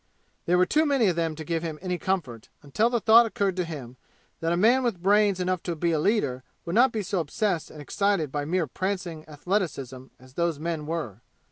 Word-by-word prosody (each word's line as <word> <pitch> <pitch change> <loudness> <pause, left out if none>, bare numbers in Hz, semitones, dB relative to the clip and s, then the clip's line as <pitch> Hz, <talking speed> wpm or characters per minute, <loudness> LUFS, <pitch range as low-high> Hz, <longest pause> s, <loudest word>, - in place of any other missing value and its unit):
There 180 +1 +3
were 180 - +4
too 305 +11 +2
many 270 -8 +3
of 175 - -1
them 165 -2 -1
to 160 - -7
give 165 0 -2
him 160 -2 -5
any 180 -2 -3
comfort, 145 - -3
until 210 - +1
the 240 -1 0
thought 225 +3 +6
occurred 200 -4 -1
to 180 - +1
him 135 -7 -8 0.4
that 165 0 -1
a 175 - +1
man 235 +7 +4
with 225 -9 -2
brains 205 -1 +3
enough 180 -1 -1
to 175 - -3
be 170 +2 0
a 160 - +1
leader 150 - 0 0.2
would 170 - -4
not 245 +4 +5
be 215 -2 -3
so 190 0 -1
obsessed 170 +2 -1
and 155 - -12
excited 185 -1 0
by 145 0 -2
mere 170 +3 0
prancing 180 0 -4
athleticism 145 - -3
as 130 0 -18
those 170 0 0
men 160 -1 -4
were. 150 - -4
170 Hz, 220 wpm, -26 LUFS, 155-200 Hz, 0.4 s, thought